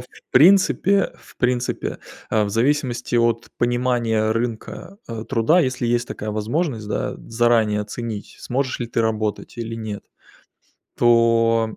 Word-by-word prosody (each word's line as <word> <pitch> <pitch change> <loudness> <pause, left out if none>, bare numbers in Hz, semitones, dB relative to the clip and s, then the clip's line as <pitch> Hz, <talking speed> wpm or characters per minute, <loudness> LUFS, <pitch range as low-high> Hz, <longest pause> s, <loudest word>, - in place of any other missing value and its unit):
в 125 - -11 0.2
принципе, 195 +5 +4
в - - -19
принципе, 125 0 -1 0.3
э, 110 -1 +2
в - - -3
зависимости 125 +2 0
от 115 -1 +1
понимания 120 -3 +1
рынка, 120 - -4
э, 115 -1 -5
труда, 135 +9 +3
если 130 -5 -1
есть 120 0 0
такая 105 - -5
возможность, 110 +2 -2
да, - - -2
заранее 115 -2 +2
оценить, 105 0 -6
сможешь 130 +1 -2
ли 120 - -2
ты 115 - -1
работать 110 -1 -2
или 115 -1 -4
нет, 110 -2 -6 0.9
то 115 -1 +3
115 Hz, 135 wpm, -21 LUFS, 110-125 Hz, 0.9 s, принципе